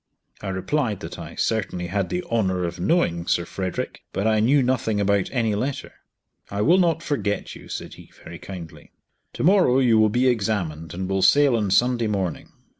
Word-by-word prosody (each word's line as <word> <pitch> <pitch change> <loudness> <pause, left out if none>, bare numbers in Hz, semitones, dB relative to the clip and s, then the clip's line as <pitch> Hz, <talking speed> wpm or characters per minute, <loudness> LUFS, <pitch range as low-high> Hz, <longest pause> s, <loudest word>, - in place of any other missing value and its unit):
I 105 - -6
replied 105 +4 -1
that - - -7
I - - -8
certainly 95 -5 -1
had 95 +1 -2
the 180 0 -2
honour 95 -6 0
of 85 +1 -4
knowing 90 - +1
Sir 85 - +1
Frederick, 95 0 -4
but 100 - -1
I 110 -1 +3
knew 130 +5 +4
nothing 115 -4 0
about 100 -1 +1
any 115 -5 0
letter. 130 +7 -3 0.6
"I 100 +1 -1
will 175 - +5
not 170 -2 +1
forget 105 - -2
you," - - -13
said - - -6
he, - - -15
very 85 +1 -9
kindly. 90 -5 -10 0.4
"Tomorrow 180 -8 +3
you 120 -4 +4
will 110 0 +5
be 120 +4 +1
examined, 95 -9 -1
and 95 +1 -3
will 95 0 0
sail 140 +6 +5
on 105 -3 0
Sunday 120 +3 +2
morning." 95 -5 -3
105 Hz, 185 wpm, -23 LUFS, 95-125 Hz, 0.6 s, will